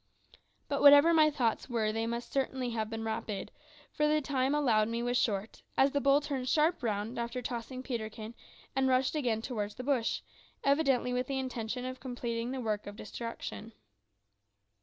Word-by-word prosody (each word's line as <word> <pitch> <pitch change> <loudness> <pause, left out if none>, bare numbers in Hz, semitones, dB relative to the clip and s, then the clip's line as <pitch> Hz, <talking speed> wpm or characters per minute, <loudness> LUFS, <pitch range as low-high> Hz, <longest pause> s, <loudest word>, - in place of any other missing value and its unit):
But 280 - -1
whatever 290 +3 +8
my 310 -1 +6
thoughts 250 -4 -1
were 220 -3 +1
they 225 +1 -1
must 235 +1 -4
have 250 -5 -1
been 225 0 -4
rapid, 220 -2 -4 0.4
for 300 - +1
the 305 0 +3
time 270 -1 0
allowed 230 -8 +3
me 230 +1 -2
was 245 0 0
short, 210 -3 -1 0.2
as 270 +1 +5
the 285 - 0
bull 275 +1 +4
turned 270 -3 -3
sharp 315 +4 +2
round 220 0 -2
after 235 +1 -3
tossing 250 +2 -5
Peterkin 220 -3 -5 0.4
and 265 0 +2
rushed 255 0 +2
again 240 -7 0
towards 210 -5 -3
the 255 - -6
bush, 255 -4 0 0.4
evidently 275 -3 +2
with 250 0 -1
the 275 - -2
intention 250 -1 -3
of 255 0 -5
completing 240 -2 -3
the 265 0 -3
work 215 -4 -2
of 205 - -7
destruction. 230 0 -7
250 Hz, 170 wpm, -31 LUFS, 225-270 Hz, 0.4 s, whatever